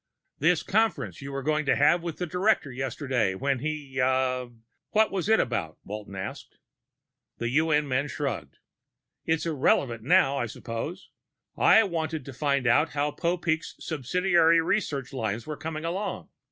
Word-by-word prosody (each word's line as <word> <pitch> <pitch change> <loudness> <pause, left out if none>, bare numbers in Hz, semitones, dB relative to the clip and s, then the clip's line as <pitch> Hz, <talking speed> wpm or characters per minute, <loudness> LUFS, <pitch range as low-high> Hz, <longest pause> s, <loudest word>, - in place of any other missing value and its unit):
"This 165 +3 +3
conference 170 - 0
you 140 +1 -6
were 135 0 -4
going 155 +2 +1
to - - +4
have 155 +4 +4
with 170 -2 -5
the 180 - -2
director 180 -3 +1
yesterday 130 -5 -1
when 135 +5 0
he 145 -2 -4
ah, 130 -1 +1 0.4
what 220 0 +3
was 195 0 -2
it 220 - +5
about?" 85 -10 -1
Walton 105 -1 -7
asked. 95 0 -7 0.8
The 115 - -2
UN 150 +2 +2
man 130 +2 0
shrugged. 135 - -4 0.7
"It's 160 0 +1
irrelevant 135 -6 +1
now, 135 +3 +4
I 120 - -1
suppose. 120 - -6 0.4
I 225 - +6
wanted 160 -6 -3
to 135 - -8
find 140 0 0
out 145 +6 +3
how 145 0 0
Popeek's 170 -1 -1
subsidiary 165 +3 +2
research 150 - -1
lines 110 -3 -2
were 155 - -4
coming 155 +1 -5
along. 190 +5 -3
145 Hz, 155 wpm, -27 LUFS, 130-165 Hz, 0.8 s, I